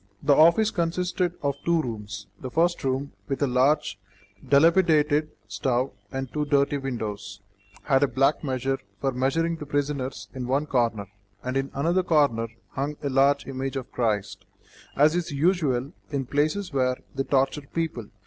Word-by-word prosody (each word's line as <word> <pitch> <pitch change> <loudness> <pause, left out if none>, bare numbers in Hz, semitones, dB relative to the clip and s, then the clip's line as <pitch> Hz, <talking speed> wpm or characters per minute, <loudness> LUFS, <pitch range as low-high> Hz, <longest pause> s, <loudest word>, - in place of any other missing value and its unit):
The 145 0 +5
office 170 +9 +5
consisted 175 +1 -1
of 140 -1 0
two 170 -1 +2
rooms. 105 -6 -5
The 130 - -6
first 170 +5 +1
room, 135 +1 -1 0.2
with 135 - -2
a - - +5
large, 130 -3 +2 0.5
dilapidated 155 -1 +4 0.2
stove 130 +1 0 0.2
and 135 0 -3
two 150 - 0
dirty 140 0 +2
windows, 110 -6 -5 0.4
had 135 -2 +3
a 145 - +4
black 135 +4 +1
measure 135 -1 -1 0.2
for 135 - 0
measuring 160 +7 0
the 150 - -8
prisoners 145 -2 -2
in 125 -2 -5
one 140 +4 +1
corner, 115 -7 0 0.4
and 125 +1 -3
in 135 0 0
another 170 +7 +2
corner 145 -10 +2 0.2
hung 145 +2 -3
a 140 - 0
large 140 +1 +3
image 135 0 -4
of 130 -2 -5
Christ, 105 -5 -1 0.5
as 150 +3 +4
is 175 -1 -1
usual 145 -4 +1 0.2
in 140 -3 -2
places 155 +7 0
where 130 -1 +1 0.2
they 135 - -2
torture 135 +1 0
people. 160 -10 -3
140 Hz, 160 wpm, -25 LUFS, 130-155 Hz, 0.5 s, The